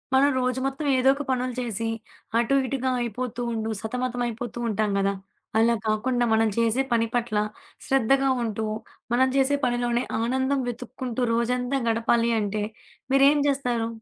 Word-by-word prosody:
మనం 280 +2 +5
రోజు 255 0 0
మొత్తం 275 +2 -2
ఏదో 255 +1 +4
ఒక 290 - -4
పనులు 255 -1 0
చేసి, 230 -2 -3 0.5
అటు 240 +4 +2
ఇటుగా 260 -1 -1
అయిపోతూ 240 +1 -3
ఉండు 225 -1 -2
సతమతం 245 +2 -3
అయిపోతూ 240 0 -5
ఉంటాం 215 0 0
కదా! 195 0 +1 0.5
అలా 235 +1 +4
కాకుండా 240 +3 +1
మనం 220 0 +3
చేసే 230 +2 +2
పని 230 -1 +2
పట్ల 235 -3 0 0.5
శ్రద్ధగా 270 +1 +3
ఉంటూ, 220 -1 -2 0.5
మనం 260 +2 +4
చేసే 275 +1 +3
పనిలోనే 240 0 0 0.2
ఆనందం 260 +4 +1
వెతుక్కుంటూ 250 +1 -4
రోజంతా 250 +3 0
గడపాలి 230 +1 +2
అంటే, 205 0 -2 0.5
మీరేం 275 +2 +6
చేస్తారు? 245 -5 0
245 Hz, 140 wpm, -25 LUFS, 230-260 Hz, 0.5 s, మీరేం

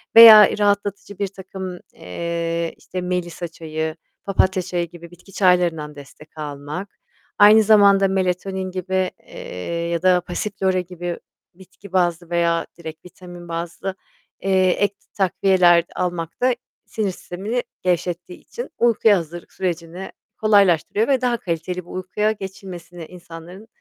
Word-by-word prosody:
Veya 220 -3 +10
rahatlatıcı 205 -1 -1
birtakım, 190 -2 -6
eee, 170 - -3
işte, 185 0 -6
melisa 180 -1 -3
çayı, 160 -1 -5 0.3
papatya 190 -1 +1
çayı 175 -2 -3
gibi 170 0 -12
bitki 180 +3 -17
çaylarından 175 -6 +2
destek 145 +2 -14
almak, 150 +6 -7 0.4
aynı 215 +1 +8
zamanda 200 -2 +6
melatonin 190 0 -1
gibi, 185 0 -1
eee, 170 - -6
ya 170 -1 -1
da 180 -1 +4
passiflora 190 +1 -1
gibi 175 -1 -5 0.3
bitki 185 +1 -16
bazlı 175 -2 +1
veya 170 -1 +1
direkt 160 0 -9
vitamin 175 -1 -12
bazlı, 170 +3 -4 0.5
eee, 190 -1 +3
ek 200 +2 +1 0.2
takviyeler 185 -2 +4
almak 175 +1 -3
da 250 -1 +3 0.3
sinir 210 -3 -2
sistemini 200 +7 -4 0.2
gevşettiği 180 0 -2
için 485 - -8
uykuya 225 -3 +4
hazırlık 170 0 -7
sürecini 175 0 -4 0.3
kolaylaştırıyor 205 -1 +3
ve 265 -2 +2
daha 245 -2 +1
kaliteli 180 -2 -4
bir - - -17
uykuya 200 +4 -1
geçilmesini, 190 -4 -8
insanların 175 +4 -12
180 Hz, 125 wpm, -21 LUFS, 170-195 Hz, 0.5 s, Veya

